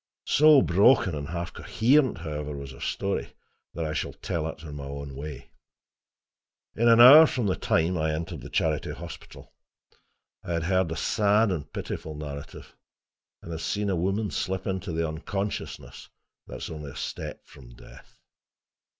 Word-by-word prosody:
So 150 -2 +6
broken 100 +1 +4
and 70 -1 -4
half 85 0 -5
coherent, 125 0 +2
however, 75 -3 -5
was 70 -1 -8
her 65 - -13
story 100 0 -3 0.4
that 85 - -2
I 75 - -3
shall - - -3
tell 80 -2 -3
it 80 0 -8
in 75 -3 -8
my 70 -1 -7
own 70 0 -7
way. 70 0 -8 1.2
In 115 +2 +2
an 115 0 +6
hour 145 +7 +10
from 125 -5 -2
the 95 -2 +1
time 85 +2 0
I 80 0 0
entered 80 -1 -5
the - - -9
Charity 80 -2 -1
Hospital, - - -11 0.9
I 85 - -4
had 85 -1 -1
heard 95 -1 +1
a - - -2
sad 105 0 +2
and 80 -6 -4
pitiful 80 -1 -6
narrative, 75 -1 -8 0.7
and 85 - -8
had 80 0 -5
seen 100 +5 -1
a - - +1
woman 95 +4 -1
slip 95 0 -3
into 95 -1 -3
the 80 0 -1
unconsciousness 95 +6 -5 0.4
that - - -7
is - - -5
only 75 -2 -7
a - - -12
step - - -6
from - - -15
death. - - -16
85 Hz, 165 wpm, -26 LUFS, 75-100 Hz, 1.2 s, hour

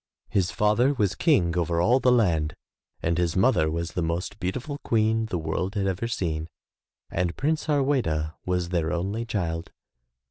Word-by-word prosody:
His 95 -2 +1
father 115 +8 +2
was 100 -6 +1
King 90 - +2
over 85 -1 0
all 120 +9 +4
the 125 - +4
land 85 -11 +2 0.5
and 85 +1 +1
his 85 -2 0
mother 95 -6 +3
was 85 +1 -3
the 90 - -2
most 85 +2 -2
beautiful 125 +10 -3
Queen 110 -2 +1
the 95 - -2
world 85 +5 -2
had 100 -1 0
ever 95 +4 -1
seen 80 -8 -2 0.6
and 85 -1 -1
Prince 155 +3 0
Harweda 130 - +1
was 90 -1 -1
their 85 -2 0
only 100 +7 -2
child. 85 -7 -3
90 Hz, 165 wpm, -26 LUFS, 85-115 Hz, 0.6 s, all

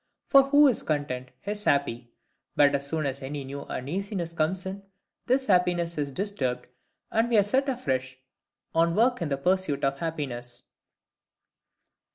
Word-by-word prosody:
For 275 -1 +6
who 290 +1 +7
is 255 - +1
content 135 -4 -2 0.2
is 205 +1 -4
happy. 125 -4 +1 0.5
But 145 -1 +5
as 140 0 -1
soon 155 0 -1
as 135 0 -3
any 140 +1 -5
new 140 +1 -7
uneasiness 175 - -4
comes 170 +4 -1
in, 190 +1 -5 0.5
this 260 +1 +2
happiness 180 -4 +2
is 145 -2 -2
disturbed, 130 -9 -2 0.5
and 225 +2 +2
we 235 - +3
are 205 - +6
set 265 +7 +1
afresh 130 - -2 0.6
on 165 +1 +3
work 245 0 +3
in 165 - -1
the 140 - 0
pursuit 180 -2 +1
of 135 0 -1
happiness. 130 -7 -4
165 Hz, 155 wpm, -27 LUFS, 140-200 Hz, 0.6 s, who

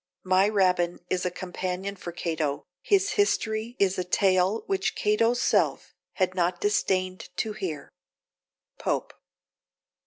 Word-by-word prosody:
My 185 +2 +4
Rabbin 180 -4 +2
is 180 0 +1
a - - +1
companion 185 +2 -4
for 180 -2 -7
Cato. 160 -4 -2 0.2
His 395 0 +2
history 230 - 0
is 195 -1 +2
a - - 0
tale 185 +3 +2
Which 195 -1 -1
Cato's 230 +3 +2
self - - +1 0.2
had 185 -1 0
not 175 -1 0
disdained 185 -3 0
to 220 - -1
hear. 160 -8 -5 0.9
POPE. - - -2
185 Hz, 125 wpm, -27 LUFS, 180-210 Hz, 0.9 s, My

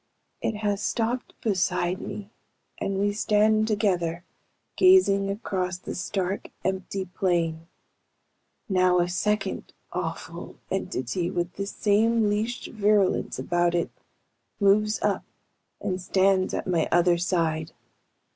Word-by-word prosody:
"It 225 - -1
has 205 -1 -1
stopped 240 +3 -2
beside 185 -3 0
me 210 0 -7 0.5
and 195 0 -1
we 205 +1 +1
stand 215 +1 +3
together, 180 -6 0 0.5
gazing 370 - +5
across 185 -3 -2
the 185 - -7
stark, 190 +1 -3 0.2
empty 190 +1 -2
plain. 170 -3 -1 1.0
Now 185 -2 +3
a 175 0 +3
second 195 +3 -1 0.2
awful - - -5 0.2
entity, 170 +8 -2
with 175 -1 -2
the 200 0 -4
same 215 +2 +2
leashed 220 +4 -2
virulence 205 -3 +2
about 175 0 +1
it, 170 - 0 0.7
moves 210 +1 +3
up - - +1 0.6
and 185 -2 -2
stands 190 +1 +2
at - - -3
my 170 -4 +1
other 175 0 +4
side. 165 -3 0
195 Hz, 115 wpm, -26 LUFS, 175-210 Hz, 1.0 s, gazing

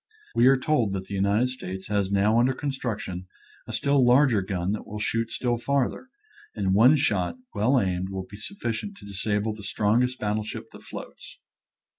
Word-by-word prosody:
We 120 +2 +5
are 135 0 +6
told 130 -7 +1
that 95 -1 -3
the 100 - -8
United 100 +6 +2
States 95 -6 -6
has 100 -2 0
now 105 +3 +3
under 125 +2 +3
construction 115 -10 -4 0.4
a - - -5
still 140 -1 +2
larger 125 -3 +5
gun 95 -1 -2
that 105 - -4
will 105 - -6
shoot 115 +2 -1
still 120 -1 0
farther, 140 - -1 0.5
and 95 -3 0
one 120 +9 +7
shot 100 - +1 0.2
well 120 +6 +3
aimed 95 -2 -1
will 95 -1 -4
be 100 - -11
sufficient 200 - -4
to - - -13
disable 105 +2 -1
the 105 - -10
strongest 110 +6 +1
battle 105 -1 -1
ship 110 - -7
that - - -13
floats. - - -10
110 Hz, 180 wpm, -26 LUFS, 100-125 Hz, 0.5 s, one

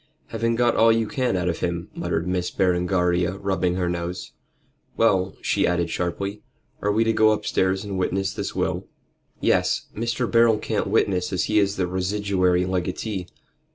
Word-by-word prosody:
"Having 115 +1 0
got 120 0 +2
all 115 0 +5
you 115 0 +2
can 125 -5 0
out 90 0 -1
of 85 - -1
him," 85 -1 -3
muttered 80 +2 -2
Miss 90 -1 -1
Berengaria, 90 -1 +1
rubbing 95 -3 0
her 90 -1 -1
nose. 85 +1 -4 0.7
"Well," 95 -4 +2
she - - +2
added 85 -1 0
sharply, 100 +4 -3 0.4
"are 105 - +1
we 110 +2 +3
to 115 0 +1
go 110 0 +5
upstairs 95 -3 0
and 100 -2 -3
witness 95 +2 -1
this - - -4
will?" - - -2 0.5
"Yes! - - +2
Mr. 115 +2 -1
Beryl 115 -1 +4
can't - - -2
witness 90 -1 +1
as 90 -5 0
he 105 0 +2
is 100 -1 +1
the 95 - 0
residuary 95 -1 +1
legatee. 95 +1 -3
95 Hz, 165 wpm, -24 LUFS, 90-105 Hz, 0.7 s, all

